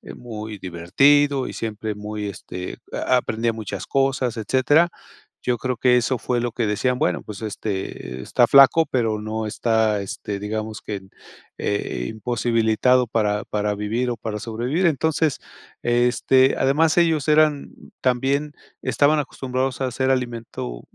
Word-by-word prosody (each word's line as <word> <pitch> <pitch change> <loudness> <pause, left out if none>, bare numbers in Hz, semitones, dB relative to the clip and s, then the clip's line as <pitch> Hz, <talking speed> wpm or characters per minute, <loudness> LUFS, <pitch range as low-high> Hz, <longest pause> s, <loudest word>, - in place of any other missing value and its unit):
muy 110 -3 -7
divertido, 135 +11 +2
y - - -6
siempre 110 -1 -4
muy, 105 0 -5
este, 90 -1 -7 0.3
aprendía 115 -2 +1
muchas 105 -3 -6
cosas, 135 -3 0
etcétera. 135 - +3 0.5
Yo 125 -1 0
creo 125 +2 -2
que 125 +1 +4
eso 125 +1 0
fue 125 -1 -1
lo 120 -1 -2
que 115 0 -1
decían: 125 +5 0
"Bueno, - - 0
pues, 105 -1 -9
este, 95 - -5
está - - +2
flaco 140 +4 +7
pero 115 -4 0
no 110 +1 -3
está, 110 -1 +1
este, 100 +1 -5
digamos 110 +1 -4
que, 100 -2 -5 0.6
eh, 100 -11 -2
imposibilitado 115 +2 +1
para 105 -2 0
para 105 0 -1
vivir, 110 +5 -1
o, 120 - -4
para 105 0 -4
sobrevivir". 120 - -1
Entonces, 160 -1 +1 0.5
este, 125 +2 +3
además 155 +5 +2
ellos 160 -4 +3
eran 150 -2 +3 0.3
también 135 +4 0 0.3
estaban 145 +5 +3
acostumbrados 130 -2 -3
a - - +1
hacer 130 +2 -1
alimento, 115 - -3
120 Hz, 140 wpm, -22 LUFS, 105-135 Hz, 0.6 s, flaco